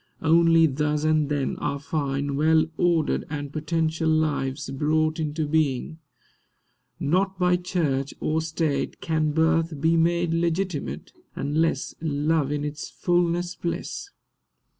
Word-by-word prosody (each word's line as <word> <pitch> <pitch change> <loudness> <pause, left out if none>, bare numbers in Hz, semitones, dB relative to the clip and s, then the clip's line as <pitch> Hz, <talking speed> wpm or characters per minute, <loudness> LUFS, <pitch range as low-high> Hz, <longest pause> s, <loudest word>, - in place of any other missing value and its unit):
Only 165 0 +5
thus 150 +1 0
and 155 -2 +2
then 145 -2 -1
Are 140 - -2
fine, 140 -1 -2
well 155 +2 +4
ordered, 170 -3 +1
and 145 -2 -5
potential 160 0 0
lives 150 -3 0
Brought 155 +3 +1
into 155 0 -2
being. 155 0 0 1.0
Not 190 +5 +1
by 180 -1 +3
Church 160 -7 -1
or 155 +1 0
State 160 -2 -2
Can 155 -2 0
birth 160 0 +1
be 160 +3 +3
made 170 0 +2
legitimate, 170 -1 -2 0.2
Unless 155 +4 0
Love 150 -1 0
in 145 0 -2
its 150 0 -5
fulness 175 0 0
bless. 175 - -4
155 Hz, 120 wpm, -25 LUFS, 145-165 Hz, 1.0 s, Only